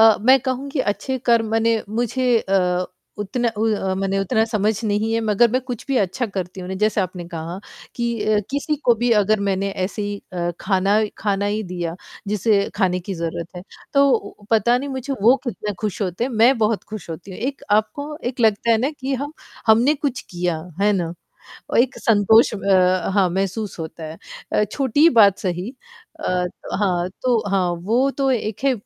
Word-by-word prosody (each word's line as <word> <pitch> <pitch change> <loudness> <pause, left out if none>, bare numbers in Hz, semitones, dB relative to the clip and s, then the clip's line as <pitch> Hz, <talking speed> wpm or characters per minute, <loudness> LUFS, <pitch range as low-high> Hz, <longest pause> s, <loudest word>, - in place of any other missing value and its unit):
अ, 220 -1 +7
मैं 260 +4 +6
कहूँगी 265 +2 -2
अच्छे 260 +5 -4
कर्म 230 -2 +4
मने 225 0 +2
मुझे 240 +3 -1
अ, 180 -3 +1 0.3
उतना 235 +4 -1
उ 220 - +1 0.3
मने 195 0 0
उतना 220 +3 +2
समझ 215 -1 +1
नहीं 215 +1 0
है 230 - +1
मगर 220 +1 +3
मैं 255 - +1
कुछ 245 -3 -6
भी 270 - +1
अच्छा 215 +7 -2
करती 190 -2 -5
हूँ 180 - -7
ना 190 - -3
जैसे 215 -1 +2
आपने 180 -1 -4
कहा, 170 +1 -6 0.4
कि 235 -2 -2
अ, 215 0 +3
किसी 285 +2 -1
को 240 - +5
भी 240 +2 0
अगर 210 +1 +2
मैंने 195 +1 0
ऐसे 205 +2 -4
ही 205 0 -3 0.2
अ, 175 -1 -1
ख़ाना 195 +2 +2 0.2
ख़ाना 200 -1 0
ही 210 +1 -1
दिया 175 -3 -4 0.3
जिसे 205 0 +2
खाने 185 -3 +1
की 195 +2 -5
ज़रूरत 170 0 -4
है, 180 - -7 0.3
तो 245 -7 +2
पता 230 +2 +4
नहीं 280 +2 -5
मुझे 265 +1 -4
वो 245 +5 +6
कितने 210 -3 -3
खुश 210 -1 -2
होते 185 +4 -2
हैं 260 - -3
मैं 235 +3 +4
बहुत 215 -1 +1
खुश 215 -5 -7
होती 165 +4 -8
हूँ, 185 - -8
एक 265 +4 -4
आपको 220 +9 0
एक 250 0 -6
लगता 225 0 +3
है 225 - +5
ना 260 +5 0
कि 270 +1 -1
हम 285 +3 -4 0.3
हमने 235 +7 +5
कुछ 275 -4 -2
किया। 175 -2 -2 0.2
है 210 +1 +4
ना? 170 -4 -1 0.6
और - - +2
एक 250 +2 +2
संतोष 220 +1 +4
अ, 185 -3 +2
हाँ, 195 -3 +4
महसूस 195 +2 -2
होता 160 0 -7
है 155 +1 -8 0.3
अ, 210 - +3
छोटी 275 +8 +3
बात 200 -3 +6
सही 180 +4 -3 0.6
अ, 180 0 +1 0.3
हाँ 180 -3 +1
तो 245 -3 +3
हाँ 190 -2 +2 0.2
वो 245 +6 +2
तो 270 -1 +2
एक 220 0 -3
है 275 - +4
215 Hz, 190 wpm, -21 LUFS, 190-240 Hz, 0.6 s, अ